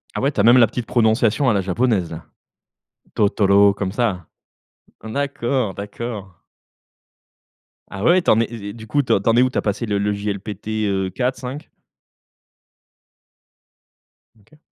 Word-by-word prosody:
Ah -, -, -2 dB
ouais, 140 Hz, +2 st, +1 dB
tu 110 Hz, -, -5 dB
as -, -, +4 dB
même 120 Hz, +3 st, +7 dB
la 115 Hz, -, +6 dB
petite 120 Hz, +1 st, -5 dB
prononciation 115 Hz, +3 st, +2 dB
à -, -, +3 dB
la 100 Hz, -, +1 dB
japonaise 95 Hz, -1 st, 0 dB
là. 80 Hz, -1 st, -8 dB, 0.9 s
Totoro 100 Hz, -1 st, +4 dB
comme 100 Hz, -1 st, -4 dB
ça. 105 Hz, -8 st, -1 dB, 0.8 s
D'accord, 130 Hz, -3 st, -2 dB
d'accord. 100 Hz, -3 st, -7 dB, 1.5 s
Ah 100 Hz, +1 st, -7 dB
ouais, 175 Hz, +6 st, +4 dB
t'en 110 Hz, -, +3 dB
es 115 Hz, -, +2 dB
et 100 Hz, -3 st, -7 dB
du 110 Hz, -1 st, -11 dB
coup, 145 Hz, +6 st, +1 dB
t'en 115 Hz, 0 st, +2 dB
es 120 Hz, -, +5 dB
où? 130 Hz, -, +3 dB
Tu -, -, -5 dB
as -, -, +2 dB
passé 105 Hz, +3 st, -2 dB
le 105 Hz, -2 st, -1 dB
le 100 Hz, +1 st, 0 dB
JLPT, 100 Hz, 0 st, -5 dB, 0.2 s
heu, 95 Hz, -1 st, -1 dB
4 125 Hz, +5 st, -2 dB
5? 130 Hz, +4 st, -7 dB, 2.7 s
OK. 150 Hz, +9 st, -24 dB
110 Hz, 150 wpm, -20 LUFS, 100-125 Hz, 2.7 s, même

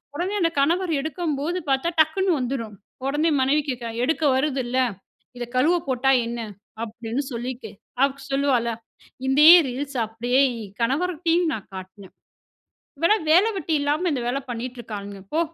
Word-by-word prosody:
உடனே 365 Hz, +5 st, -2 dB
அந்த 330 Hz, -1 st, +2 dB
கணவர் 340 Hz, +4 st, +1 dB
எடுக்கும்போது 315 Hz, +2 st, -2 dB
பார்த்தா, 270 Hz, +5 st, +1 dB
டக்குனு 370 Hz, +4 st, +1 dB
வந்துரும். 240 Hz, -5 st, -3 dB, 0.3 s
உடனே 295 Hz, +4 st, +1 dB
மனைவி 285 Hz, +3 st, +3 dB
கேக்கறா, 240 Hz, -2 st, -4 dB
"எடுக்க 320 Hz, +3 st, 0 dB
வருதுல்ல, 260 Hz, -2 st, 0 dB, 0.6 s
இத 240 Hz, -, -4 dB
கழுவ 330 Hz, +7 st, +4 dB
போட்டா 260 Hz, +1 st, +2 dB, 0.2 s
என்ன?" 235 Hz, 0 st, -4 dB, 0.4 s
அப்படின்னு 230 Hz, +3 st, -4 dB
சொல்லிட்டு, 245 Hz, +2 st, -5 dB, 0.3 s
அவள் 275 Hz, 0 st, +2 dB, 0.2 s
சொல்லுவாளா? 260 Hz, -4 st, +1 dB, 0.5 s
இதே 295 Hz, +4 st, +7 dB, 0.2 s
ரீல்ஸ 270 Hz, +2 st, -5 dB
அப்படியே 240 Hz, +4 st, +1 dB, 0.2 s
இ -, -, -6 dB, 0.2 s
கணவர்கிட்டயும் 330 Hz, +5 st, +1 dB
நான் 205 Hz, -, -7 dB
காட்னேன். 190 Hz, +1 st, -10 dB, 0.9 s
"இவள்லாம் 335 Hz, 0 st, +2 dB
வேல 370 Hz, +6 st, +6 dB
வெட்டி 320 Hz, -2 st, -1 dB
இல்லாம 300 Hz, +5 st, 0 dB
இந்த 250 Hz, -4 st, -2 dB
வேல 265 Hz, +3 st, 0 dB
பண்ணிட்டு 245 Hz, +1 st, -5 dB
இருக்கானுங்க 200 Hz, -3 st, -7 dB
போ. 330 Hz, -, +3 dB
275 Hz, 140 wpm, -23 LUFS, 240-320 Hz, 0.9 s, இதே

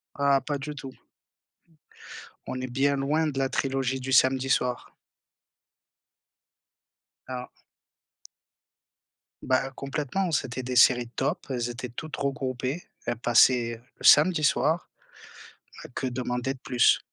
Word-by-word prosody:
Ah, 140 Hz, -1 st, +3 dB
pas 145 Hz, +1 st, -3 dB
du 150 Hz, +2 st, -6 dB
tout. 135 Hz, -1 st, -8 dB, 1.6 s
On 130 Hz, -, -4 dB
est 130 Hz, -1 st, -5 dB
bien 140 Hz, +2 st, +2 dB
loin 150 Hz, +4 st, 0 dB
de 140 Hz, -3 st, -4 dB
la 135 Hz, -1 st, +1 dB
trilogie 135 Hz, 0 st, -1 dB
du 130 Hz, +1 st, -3 dB
samedi 130 Hz, 0 st, +3 dB
soir. 125 Hz, -1 st, -1 dB, 2.3 s
Ah! 125 Hz, -1 st, -6 dB, 1.9 s
Bah, 130 Hz, +1 st, +1 dB
heu, -, -, -9 dB
complètement. 150 Hz, +6 st, -2 dB
C'était 130 Hz, -3 st, -2 dB
des 125 Hz, 0 st, -4 dB
séries 125 Hz, -1 st, +5 dB
top, 135 Hz, -, -1 dB
elles 120 Hz, -2 st, -2 dB
étaient 120 Hz, 0 st, -6 dB
toutes 155 Hz, +6 st, -7 dB
regroupées, 135 Hz, +2 st, -3 dB, 0.2 s
elles 120 Hz, -, -1 dB
passaient 120 Hz, -1 st, +3 dB, 0.2 s
le -, -, -15 dB
samedi 155 Hz, 0 st, +6 dB
soir, 155 Hz, +4 st, +1 dB, 1.1 s
que 130 Hz, -, -2 dB
demander 125 Hz, +1 st, -2 dB
de 130 Hz, -, -15 dB
plus? 125 Hz, -2 st, +3 dB
130 Hz, 125 wpm, -26 LUFS, 125-140 Hz, 2.3 s, samedi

